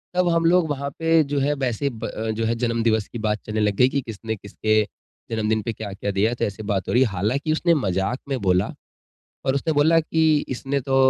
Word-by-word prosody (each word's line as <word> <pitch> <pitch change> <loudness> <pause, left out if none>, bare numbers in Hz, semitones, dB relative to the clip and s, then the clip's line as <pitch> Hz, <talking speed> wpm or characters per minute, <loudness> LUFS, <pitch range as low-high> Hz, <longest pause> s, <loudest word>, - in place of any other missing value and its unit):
तब 180 -1 +3
हम 165 0 +2
लोग 170 -1 +4
वहाँ 140 -1 -2
पे 165 -1 +4
जो 140 0 -2
है 145 +2 +2
वैसे 135 0 -1
ब 115 -4 -7
अ, 110 +1 -4
जो 110 +1 -2
है 115 +1 +1
जन्म 115 -1 0
दिवस 110 -2 +2
की - - -7
बात 105 0 0
चलने 110 0 -2
लग 105 -1 +1
गयी 125 +5 +5
की 140 - -1
किसने-किसके 110 -1 -1 0.5
जन्मदिन 110 -1 0
पे 115 - -2
क्या-क्या 100 -1 -4
दिया? 105 +4 +1
तो 120 - -1
ऐसे 105 +1 -5
बात 100 -3 -1
हो - - -1
रही 125 +2 +5
है। 120 - 0
हालाँकि 110 - -1
उसने 170 +2 +3
मज़ाक 100 - -1
में 135 -2 -1
बोला 90 -1 +1 0.7
और 135 - +2
उसने 160 +3 0
बोला 155 +3 +4
की, 160 -1 +2
"इसने 135 +2 -2
तो 135 +1 -1
120 Hz, 225 wpm, -23 LUFS, 110-145 Hz, 0.7 s, गयी